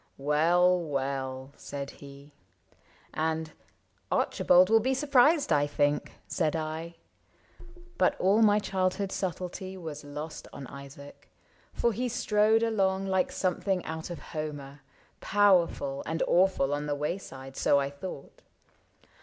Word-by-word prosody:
— - - -39
" - - -42
Well, 175 +4 +4
well! 135 -3 -3
" - - -27
said 140 -1 -6
he; 140 +1 -14 0.8
And 160 0 -2 0.3
'' - - -42
Archibald 185 +3 +4
will 225 - +7
be 260 +4 0
surprised, 280 - +4
I 145 0 +3
think," 145 0 0
Said 160 -2 0
I. 160 +1 -4 1.0
But - - +2
all 200 +4 +3
my 210 -1 +5
childhood 190 -1 -1
subtlety 185 +1 -4
Was 155 -4 -7
lost 150 +2 -7
on 140 - -8
Isaac, 140 +1 -12 0.4
for 235 - 0
he 245 +4 -2
strode 220 -2 +2
along 195 -4 +1
Like 190 -1 +1
something 185 0 -1
out 160 +1 -5
of 175 - -5 0.2
Homer 145 -3 -6 0.2
— - - -36
powerful 180 -9 +2
And 160 +1 -1
awful 175 -6 +3
on 145 +1 -2
the 145 - -1
wayside, 140 -4 -5
so 140 - +3
I 140 0 -2
thought. 140 0 -9
165 Hz, 140 wpm, -28 LUFS, 145-190 Hz, 1.0 s, will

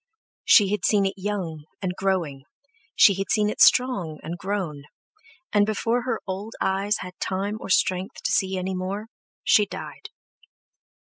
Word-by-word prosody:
She 200 -3 +6
had 210 -3 -1
seen 205 -2 +3
it 195 - 0
young, 185 -6 -4
and 185 -2 -2
growing, 170 -9 -1 0.5
she 205 - +7
had 195 - -3
seen 210 -1 +2
it - - -5
strong 220 -12 +4
and 165 +2 -5
grown, 175 -6 -4 0.7
and 205 -1 +5
before 225 +3 0
her 240 -3 -1
old 200 +4 -5
eyes 195 +2 0
had 180 -1 -7
time 200 +3 -2
or - - -7
strength 185 0 0
to - - 0
see 190 0 +1
any 185 +1 -2
more, 195 +4 -4 0.3
she 210 -1 +4
died. - - -8
195 Hz, 160 wpm, -24 LUFS, 185-210 Hz, 0.7 s, she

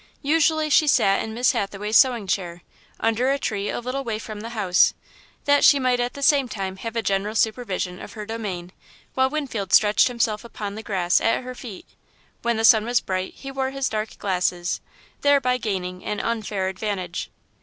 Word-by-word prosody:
Usually, 310 +1 +2
she 305 - +5
sat 195 -8 +3
in 220 0 -5
Miss 245 +2 +3
Hathaway's 205 +2 -3
sewing 245 -5 +5
chair, 175 -3 -3 0.4
under 225 +3 +1
a 275 - +2
tree 205 -6 -2
a - - -2
little 255 +3 -3
way 225 -4 -3
from 215 -1 -8
the 225 +2 -6
house, 185 -4 +3 0.5
that 285 0 +4
she 285 - +7
might 255 -2 +1
at 245 0 -1
the 280 - -7
same 275 -2 +4
time 190 -3 -4
have 230 +3 -6
a 230 - -1
general 200 +2 -1
supervision 200 -5 -1
of - - -9
her 215 -1 -7
domain, 200 -6 -5 0.4
while 260 0 +2
Winfield 255 -10 -3
stretched 210 0 +5
himself 230 -3 -1
upon 210 -3 -6
the 220 - -6
grass 185 -5 +1
at 230 +3 +1
her 255 0 -6
feet. 230 -6 -9 0.6
When 235 -1 0
the 225 - +2
sun 220 -1 +7
was 240 +1 +2
bright, 185 0 -3
he 270 - -8
wore 265 -1 -1
his 275 0 -2
dark 215 0 -4
glasses, 180 -2 -1 0.4
thereby 270 -3 +3
gaining 185 -5 -4
an 210 - -3
unfair 215 -4 -2
advantage. 190 -2 -4
220 Hz, 190 wpm, -23 LUFS, 195-255 Hz, 0.6 s, she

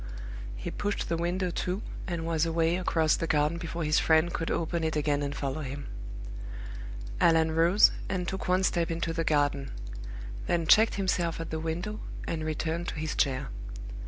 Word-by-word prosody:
He - - -5
pushed 205 0 -2
the 165 - +2
window 175 +2 0
to, 180 +4 -2 0.2
and 170 -3 -2
was 165 -1 +1
away 165 0 +2
across 160 -4 +3
the 165 - -2
garden 150 +2 +2
before 170 0 -3
his 155 0 +3
friend 160 +1 +4
could 165 - -1
open 170 0 0
it 160 -1 0
again 145 -1 +1
and 145 0 -2
follow 140 +2 -2
him. 140 0 -5 1.3
Allan 160 -1 +5
rose, 170 +6 +6 0.2
and 180 -2 -1
took 190 +1 -3
one 185 +1 +3
step 170 -3 +2
into 165 0 -1
the 165 0 0
garden; 145 -3 +2 0.8
then 170 -1 +1
checked 220 +7 +6
himself 180 -4 0
at 165 - -5
the 160 - -1
window, 175 +7 -3 0.3
and 160 -1 -2
returned 160 +2 -2
to - - -3
his 155 0 -2
chair. 130 -3 +1
165 Hz, 175 wpm, -29 LUFS, 155-175 Hz, 1.3 s, rose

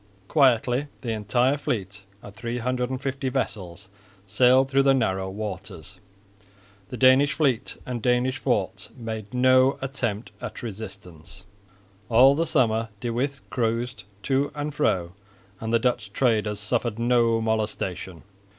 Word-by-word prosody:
Quietly 130 -1 +3
the 120 -3 -3
entire 120 +6 +1
fleet 100 - -4 0.2
of 105 - -10
350 125 +4 -2
vessels 95 -6 -4 0.4
sailed 125 +6 +4
through 135 0 +3
the 135 0 +4
narrow 95 -6 0
waters. 95 -2 -7 0.9
The 125 - -6
Danish 130 +3 +5
fleet 135 -5 0
and 125 -2 -4
Danish 125 +3 +1
forts 95 -6 -1
made 110 -3 -6
no 130 +1 +4
attempt 125 -5 -3
at 125 -2 -7
resistance. 95 -5 -9 0.6
All 125 +4 +7
the 165 +3 0
summer 115 -7 +1
De 120 +1 -3
With 135 +3 -3
cruised 115 -2 -2 0.2
to 140 +1 +1
and 150 0 -3
fro 85 -10 0 0.5
and 110 0 -4
the 115 - +5
Dutch 115 -4 -1
traders 110 -4 +1
suffered 115 +1 -1
no 115 -1 +2
molestation. 105 -5 -3
120 Hz, 125 wpm, -25 LUFS, 105-130 Hz, 0.9 s, All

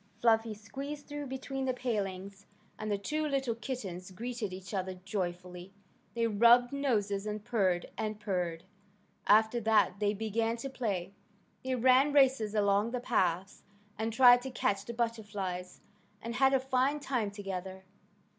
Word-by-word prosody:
Fluffy 225 -1 +3
squeezed 275 +8 -7
through 290 -1 -6
between 265 +1 -4
the 255 -1 0
palings, 200 -5 -4 0.3
and 215 -1 -3
the 205 - +1
two 305 +10 -2
little 270 -4 0
kittens 215 -7 -6
greeted 230 +1 -5
each 185 0 -8
other 190 -1 -2
joyfully. 180 -1 -4 0.4
They 230 0 +1
rubbed 235 +3 +5
noses 210 -8 0
and 210 0 -4
purred 195 -7 +1
and 215 -1 -3
purred. 180 -5 -2 0.6
After 220 +3 +5
that 215 -3 +2
they 205 0 +1
began 225 +2 -1
to 270 +4 -5
play. 200 -8 -3 0.5
They 260 0 -1
ran 260 +4 +4
races 260 -7 +3
along 205 +1 +2
the 250 +1 -3
paths, 190 -5 0 0.3
and 220 +1 -2
tried 245 +1 +7
to 265 - -5
catch 200 -5 -1
the 235 - -6
butterflies, 205 -6 -3 0.4
and 235 +2 -5
had 270 +2 +4
a - - +3
fine 265 +2 +1
time 250 -7 -1
together. 190 -2 -6
220 Hz, 150 wpm, -31 LUFS, 195-250 Hz, 0.6 s, tried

